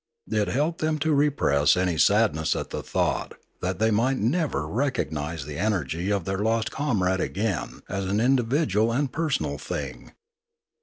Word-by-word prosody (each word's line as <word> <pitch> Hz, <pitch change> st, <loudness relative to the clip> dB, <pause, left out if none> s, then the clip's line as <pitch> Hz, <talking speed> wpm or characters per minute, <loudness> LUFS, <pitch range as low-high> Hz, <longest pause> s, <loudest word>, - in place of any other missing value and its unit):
It 105 Hz, -2 st, +1 dB
helped 155 Hz, +6 st, -1 dB
them 155 Hz, 0 st, +1 dB
to 160 Hz, -, +3 dB
repress 140 Hz, -, +3 dB
any 90 Hz, -2 st, +1 dB
sadness 80 Hz, +1 st, +3 dB
at -, -, -4 dB
the -, -, -3 dB
thought -, -, -1 dB, 0.3 s
that 90 Hz, 0 st, -2 dB
they 110 Hz, +2 st, +2 dB
might 125 Hz, +5 st, +2 dB
never 120 Hz, -, 0 dB
recognise 80 Hz, -, -2 dB
the 75 Hz, +1 st, -6 dB
energy 90 Hz, -3 st, -1 dB
of 100 Hz, -4 st, 0 dB
their 95 Hz, 0 st, -2 dB
lost 110 Hz, +1 st, 0 dB
comrade 95 Hz, -10 st, 0 dB
again 100 Hz, -3 st, -2 dB
as 100 Hz, -1 st, -3 dB
an 100 Hz, +3 st, 0 dB
individual 120 Hz, -, +2 dB
and 135 Hz, +2 st, 0 dB
personal 125 Hz, -, -1 dB
thing. 65 Hz, -4 st, -6 dB
105 Hz, 155 wpm, -25 LUFS, 85-130 Hz, 0.3 s, to